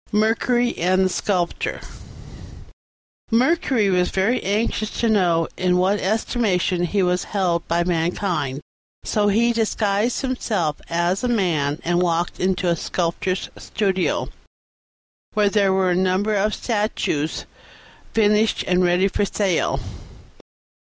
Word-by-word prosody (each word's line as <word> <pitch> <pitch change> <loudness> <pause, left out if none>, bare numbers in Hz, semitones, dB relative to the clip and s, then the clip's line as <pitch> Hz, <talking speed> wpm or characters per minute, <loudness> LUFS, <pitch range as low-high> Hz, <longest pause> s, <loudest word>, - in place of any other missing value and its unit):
MERCURY 235 +3 +1
AND 185 +2 +2
THE - - +1
SCULPTOR 180 -2 -1 1.5
Mercury 250 -2 +2
was 180 -1 +2
very 210 +7 +1
anxious 215 +1 -1
to 235 - +2
know 175 -6 +2
in 180 -1 +2
what 190 +3 +2
estimation 190 -4 0
he 195 +2 0
was 180 0 0
held 180 -4 -1
by 170 +1 +1
mankind; 170 -4 -1 0.4
so 210 -1 +1
he 230 +4 +3
disguised 220 0 0
himself 215 - -2
as 175 +4 0
a - - +1
man 165 -10 0
and 175 +1 +1
walked 170 -1 -1
into 185 0 0
a 170 - +2
Sculptor's 180 +3 -2
studio, 190 -3 -1 1.1
where 210 -1 +3
there 200 -2 +2
were 190 -1 +2
a - - +2
number 190 +3 +1
of 210 +1 +1
statues 205 - -2 0.7
finished 215 0 +2
and 180 0 +2
ready 180 +2 +3
for 200 - -1
sale. 195 -3 0
190 Hz, 125 wpm, -21 LUFS, 175-215 Hz, 1.5 s, he